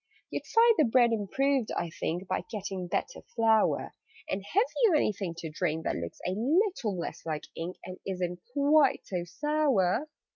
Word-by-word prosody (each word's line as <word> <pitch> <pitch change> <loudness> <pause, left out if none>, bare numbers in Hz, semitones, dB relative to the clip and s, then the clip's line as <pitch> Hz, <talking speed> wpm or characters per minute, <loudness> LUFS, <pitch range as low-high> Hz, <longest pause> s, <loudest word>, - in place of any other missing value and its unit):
"You'd - - -4
find 460 +1 +6
the 310 - +6
bread 240 0 +4
improved, 255 +4 0
I 170 - -2
think, 175 +2 -3
By 185 - -1
getting 195 -4 -4
better - - -3
flour: 225 -2 +2 0.3
And 195 +1 -3
have 400 - +2 0.2
you 430 -9 +5
anything 195 - 0
to 165 -2 -6
drink 160 -1 -1
That - - -1
looks 85 0 -6
a 180 - 0
little 255 - +1
less 170 - -5
like 155 -2 -3
ink, 170 +2 -5
And 185 0 -8
isn't 180 -2 -3
quite 285 0 +4
so 180 -3 -3
sour?" 285 - +1
205 Hz, 170 wpm, -29 LUFS, 180-280 Hz, 0.3 s, find